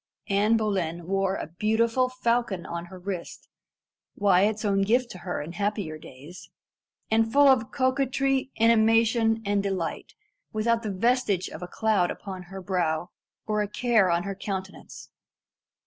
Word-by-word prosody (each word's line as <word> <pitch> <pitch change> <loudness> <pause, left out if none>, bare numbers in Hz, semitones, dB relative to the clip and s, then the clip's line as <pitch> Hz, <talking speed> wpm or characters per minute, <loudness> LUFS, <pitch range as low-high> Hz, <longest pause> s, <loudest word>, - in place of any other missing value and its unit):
Anne 205 +3 +3
Boleyn 180 -6 -2
bore 195 +1 0
a - - -4
beautiful 225 +8 +1
falcon 235 -7 -1
on 170 0 -5
her 185 +2 -11
wrist 180 -1 -6 0.7
Wyat's 205 +2 +2
own 195 -1 +2
gift 235 +5 +1
to 185 - -9
her 175 -3 -4
in 155 - -8
happier 200 -5 -3
days 150 +7 -12 0.6
and 225 0 +4
looked 225 - -9
full 285 0 +6
of 255 -5 +3
coquetry, 270 0 0
animation, 225 0 +3
and 200 0 +1
delight 190 -4 -4 0.4
without 230 +2 +1
the 220 - -4
vestige 205 -2 +1
of 155 - -9
a 180 - -5
cloud 205 -3 +1
upon 190 -2 -6
her 190 -1 -8
brow, 175 -2 -1 0.3
or 210 -1 0
a 210 - -1
care 220 -3 +2
on 170 0 +1
her 200 - -4
countenance. 190 -1 -7
205 Hz, 150 wpm, -26 LUFS, 185-230 Hz, 0.7 s, full